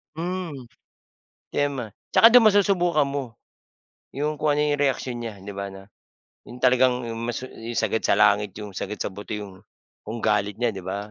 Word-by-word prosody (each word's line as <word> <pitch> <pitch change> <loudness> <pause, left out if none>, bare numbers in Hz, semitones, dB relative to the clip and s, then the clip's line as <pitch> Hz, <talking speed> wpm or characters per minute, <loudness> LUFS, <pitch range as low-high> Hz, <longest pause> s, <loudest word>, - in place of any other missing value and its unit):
Hmm. 170 -5 -4 0.9
Tama. 140 -6 -1 0.2
Tsaka 230 - +8
dun 245 -1 +7
masusubukan 180 -7 +3
mo 140 -1 -2 0.9
'yong 150 +3 -2
kung 150 -1 +1
ano 145 - 0
'yong 150 -1 +1
reaksyon 130 -3 0
niya, 105 -4 -7
'di 100 - -7
ba, 100 0 -5
'no? 95 +1 -13 0.6
'Yong 125 - -11
talagang 125 0 +4
'yong 115 -1 -5
masu 120 +2 -4
'yong 115 +1 -6
sagad 110 0 0
sa - - +4
langit, 100 -1 +3
'yong 105 -1 -7
sagad 105 - -5
sa - - -3
buto 100 +2 -7
'yong 100 -3 -7 0.5
kung 110 +2 -5
galit 105 -1 +1
niya, 120 0 0
'di 95 -3 -8
ba? 100 +2 -4
120 Hz, 180 wpm, -24 LUFS, 105-145 Hz, 0.9 s, Tsaka